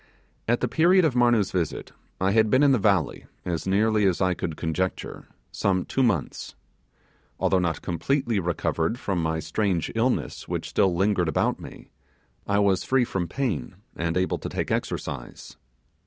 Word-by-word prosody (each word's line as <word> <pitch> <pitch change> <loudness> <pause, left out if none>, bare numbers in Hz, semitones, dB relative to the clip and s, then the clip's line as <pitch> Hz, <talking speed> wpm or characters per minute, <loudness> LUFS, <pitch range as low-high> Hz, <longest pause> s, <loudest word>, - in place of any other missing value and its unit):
At 120 +1 +1
the 125 - +1
period 175 +7 +4
of 150 - +2
Marnoo's 120 -5 +3
visit, 85 -4 -2 0.3
I 95 +1 +2
had 110 +1 +3
been 130 +5 +4
in 140 - +5
the 130 - +3
valley, 95 -6 +1 0.2
as 85 -1 -3
nearly 105 +2 +2
as 90 - +1
I 95 -1 +2
could 80 -3 -4
conjecture, 90 +3 -3 0.2
some 95 -2 0
two 135 - -1
months. 100 - -1 0.8
Although 95 - +2
not 85 -4 -1
completely 115 - 0
recovered 85 +3 -1
from 95 -7 -2
my 80 0 -1
strange 85 +2 -1
illness, 120 +3 -1
which - - -3
still 95 -3 +2
lingered 95 -2 +1
about 80 - 0
me, - - -12 0.6
I 100 - +2
was 100 -2 +2
free 130 -2 +2
from 95 -6 -2
pain 125 - -3 0.2
and 85 +1 -1
able 95 0 0
to - - -5
take - - -3
exercise. - - -4
95 Hz, 165 wpm, -25 LUFS, 85-115 Hz, 0.8 s, in